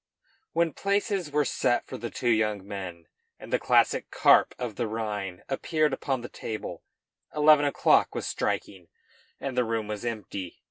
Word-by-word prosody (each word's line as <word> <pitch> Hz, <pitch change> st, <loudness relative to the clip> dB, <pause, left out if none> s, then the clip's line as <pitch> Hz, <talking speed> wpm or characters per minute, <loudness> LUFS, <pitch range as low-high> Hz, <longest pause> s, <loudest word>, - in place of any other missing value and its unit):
When 165 Hz, -2 st, +2 dB
places 200 Hz, -3 st, 0 dB
were 150 Hz, 0 st, +1 dB
set 120 Hz, -, +1 dB
for -, -, -8 dB
the 120 Hz, -, -5 dB
two 120 Hz, +1 st, 0 dB
young 105 Hz, -3 st, +1 dB
men, 90 Hz, -5 st, -6 dB, 0.3 s
and -, -, -9 dB
the -, -, +3 dB
classic -, -, +3 dB
carp -, -, +5 dB
of 120 Hz, -4 st, -4 dB
the 115 Hz, -, -1 dB
Rhine 105 Hz, -4 st, -4 dB
appeared 155 Hz, +2 st, 0 dB
upon 135 Hz, -1 st, -1 dB
the 120 Hz, -, -6 dB
table, 110 Hz, -2 st, -6 dB, 0.5 s
eleven 150 Hz, -1 st, +6 dB
o'clock 145 Hz, -, +3 dB
was -, -, -3 dB
striking 90 Hz, -4 st, -3 dB, 0.5 s
and 135 Hz, -2 st, -4 dB
the 125 Hz, -, +3 dB
room 115 Hz, -2 st, -2 dB
was 105 Hz, 0 st, -5 dB
empty. 105 Hz, -6 st, -5 dB
115 Hz, 165 wpm, -27 LUFS, 105-145 Hz, 0.5 s, eleven